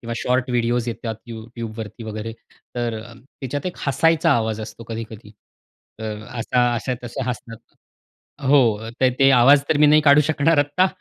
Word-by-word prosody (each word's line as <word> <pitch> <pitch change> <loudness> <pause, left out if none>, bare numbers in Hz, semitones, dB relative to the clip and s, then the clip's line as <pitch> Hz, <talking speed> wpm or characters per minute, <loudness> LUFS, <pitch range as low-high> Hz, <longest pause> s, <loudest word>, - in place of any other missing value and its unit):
किंवा 115 0 -6
short 125 +2 0
videos 120 0 0
येतात 115 -1 -4
you 115 -1 -7 0.2
YouTube 115 -1 -6
वरती 110 +1 -7
वगैरे 110 +1 -5 0.4
तर 120 -1 -2
अ, 120 - -13
त्याच्यात 135 +4 -7
एक 180 - -5
हसायचा 165 +4 +2
आवाज 110 -3 0
असतो 110 +2 -9
कधी-कधी. 110 -2 -8 0.7
अ, 110 - -7 0.3
असा 120 0 +1
अशा 125 +2 -2
तस 120 - -8
हसतात 120 -2 -5 0.9
हो, 115 -6 +3
तर 130 - +5
ते 135 0 +6
आवाज 140 +4 +6
तर 145 - +2
मी 150 - +6
नाही 150 +1 +6
काढू 145 0 +6
शकणार 160 +1 +2
आत्ता 145 +6 +3
120 Hz, 170 wpm, -21 LUFS, 115-140 Hz, 0.9 s, ते